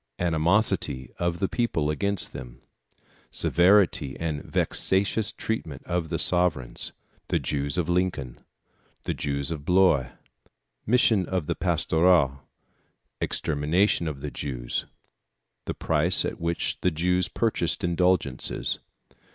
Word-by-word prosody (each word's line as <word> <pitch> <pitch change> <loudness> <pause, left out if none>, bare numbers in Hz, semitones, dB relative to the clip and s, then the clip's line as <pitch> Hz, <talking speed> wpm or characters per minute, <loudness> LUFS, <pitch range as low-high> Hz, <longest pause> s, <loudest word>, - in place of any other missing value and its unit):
Animosity 85 - +1
of 85 -1 0
the 95 - 0
People 80 -12 0
against 100 +4 0
them - - -10 0.7
Severity 90 -7 +3
and 80 -3 -2
vexatious 100 +2 +1
Treatment 80 -11 -4
of 85 -2 -2
the - - -1
Sovereigns. 85 -9 +2 0.4
The - - +1
Jews 70 +2 -2
of 85 -3 0
Lincoln. 85 -8 -1 0.6
The - - -2
Jews 70 +2 -1
of 75 -3 -5
Blois. 90 -7 +3 0.8
Mission 110 -4 +3
of 95 -4 -2
the - - -1
Pastoureaux. 80 -5 +2 0.8
Extermination 80 +5 +1
of 70 -3 -5
the - - -5
Jews. 60 -4 -4 0.8
The - - -4
Price 80 +3 +1
at - - -5
which 85 0 -1
the 90 - +3
Jews 90 +2 +1
purchased 105 -4 -1
Indulgences. 90 -6 0
85 Hz, 115 wpm, -26 LUFS, 75-90 Hz, 0.8 s, Severity